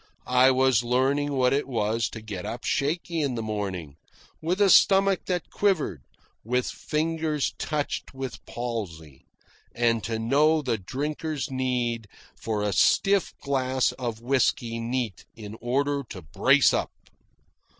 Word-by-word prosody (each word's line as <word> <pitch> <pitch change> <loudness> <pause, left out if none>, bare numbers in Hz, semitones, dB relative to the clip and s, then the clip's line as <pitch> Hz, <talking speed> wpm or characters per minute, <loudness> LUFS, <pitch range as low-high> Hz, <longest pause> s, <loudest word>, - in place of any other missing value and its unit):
I 125 +1 +5
was 130 -3 +3
learning 135 +4 +1
what 130 -1 +2
it 140 -1 0
was 115 -2 0
to 110 - -8
get 100 -4 -6
up 120 - -5
shaky 165 +3 -1
in 140 -4 -1
the 115 - -3
morning, 95 -9 -4 0.4
with 175 +5 -1
a 200 -2 +5
stomach 195 0 +5
that 180 -2 -2
quivered, 170 - 0 0.4
with 125 +2 0
fingers 155 -1 -1
touched 150 -2 -3
with 130 -2 -7
palsy, 90 - -6 0.5
and 115 -2 +1
to 115 -1 -2
know 150 +7 +3
the 120 -5 -1
drinker's 150 - -4
need 125 -4 -1 0.3
for 105 -2 -3
a 105 -1 0
stiff 195 - +3
glass 130 -2 +1
of 115 -3 -5
whisky 120 -2 +1
neat 115 -5 -3
in 105 -2 -9
order 140 +4 0
to 95 - -8
brace 75 - +4
up. - - 0
125 Hz, 140 wpm, -26 LUFS, 115-145 Hz, 0.5 s, I